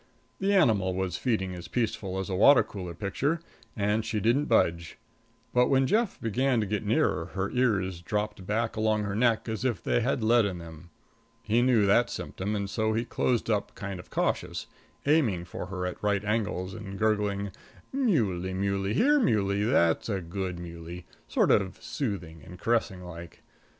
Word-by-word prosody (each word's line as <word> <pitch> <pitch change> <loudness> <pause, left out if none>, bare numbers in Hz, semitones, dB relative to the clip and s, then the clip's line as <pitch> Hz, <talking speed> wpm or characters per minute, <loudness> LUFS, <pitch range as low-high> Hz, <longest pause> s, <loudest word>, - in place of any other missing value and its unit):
The 195 +1 +1
animal 100 - +3
was 95 -2 -2
feeding 100 -7 0
as 90 -1 -8
peaceful 105 -5 -2
as 95 - -3
a 95 - -3
water 135 +8 +7
color 90 -4 -7
picture, 140 - -1 0.4
and 105 +1 +1
she 110 -1 -2
didn't 120 +8 +2
budge; 85 - +1 0.6
but 125 0 +4
when 135 -1 +3
Jeff 220 - +1
began 125 +2 +1
to 105 - 0
get 105 +1 -2
nearer, 105 - +1
her 95 +1 -1
ears 100 -8 +1
dropped 105 +2 -3
back 110 +2 0
along 110 -1 +1
her 100 -1 -3
neck 115 0 +2
as 110 0 -3
if 120 -9 -1
they - - +1
had 125 0 0
lead 115 +1 +5
in 95 -3 -2
them. 85 0 -11 0.5
He 115 +2 +2
knew 120 -4 +4
that 110 +5 +4
symptom 100 +3 -4
and 100 -1 -2
so 110 +2 0
he 115 +2 0
closed 120 0 0
up 105 -3 -1
kind 100 -2 -5
of - - -12
cautious, - - -1 0.4
aiming 125 - +2
for 90 - -6
her 95 -1 -4
at 90 - -5
right 105 -1 0
angles 105 -4 -1
and 100 -2 -7
gurgling, 105 -2 0 0.4
"Muley, 110 - +1
muley, 100 +1 -1
here 290 - +4
muley; 100 - +2
that's 85 -7 +2
a 100 -3 0
good 90 +1 -4
muley," 85 0 -8 0.2
sort - - +2
of 95 -2 +2
soothing 105 - -4
and 90 - -11
caressing 105 -4 0
like. 85 -1 -10
105 Hz, 175 wpm, -28 LUFS, 95-115 Hz, 0.6 s, water